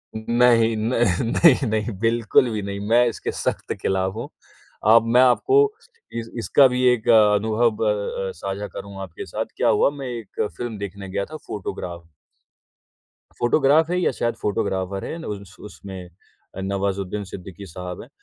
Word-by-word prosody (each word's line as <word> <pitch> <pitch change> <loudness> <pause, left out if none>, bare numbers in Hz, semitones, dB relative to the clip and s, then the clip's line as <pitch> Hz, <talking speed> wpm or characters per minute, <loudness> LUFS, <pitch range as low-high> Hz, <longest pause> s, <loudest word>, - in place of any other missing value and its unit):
नहीं, 115 0 +3
न 110 +3 -1 0.3
नहीं, 135 +2 +4
नहीं, 110 +1 -1
बिल्कुल 115 +2 +3
भी 105 -1 -2
नहीं, 100 0 -5
मैं 120 +2 +5
इसके 115 - -3
सख्त - - -3
खिलाफ 95 0 0
हूँ। 115 - -5 0.6
अ, 110 +2 +8
मैं 120 +2 +4
आपको 380 - +4 0.6
इस 115 0 -7
इसका 135 +4 +5
भी 125 0 -1
एक 115 -2 -4
अ, 105 -2 +6
अनुभव 110 +1 +1
अ 100 -2 -2
अ, - - -4
साझा 100 +4 -4
करूँगा 100 -1 -9
आपके 90 -3 -8
साथ। - - -3
क्या - - +2
हुआ, 105 - +4
मैं 140 -2 -7
एक 115 -5 -5 0.2
फ़िल्म 120 -3 -4
देखने 100 -1 -7
गया 100 +1 -2
था 155 - -9
फोटोग्राफ। 90 -3 -6 1.4
फ़ोटोग्राफ 145 +6 +3
है 180 +1 0
या 180 - +2
शायद 120 -2 -2
फ़ोटोग्राफर 95 -1 -2
है - - -5
अन 165 - -8
उस 100 -2 -7
उसमें 95 -3 -9 0.5
अ, 95 - -5
नवाजुद्दीन 100 +1 -2
सिद्दीकी 95 0 -9
साहब 90 0 -7
हैं। - - -13
110 Hz, 165 wpm, -22 LUFS, 100-120 Hz, 1.4 s, अ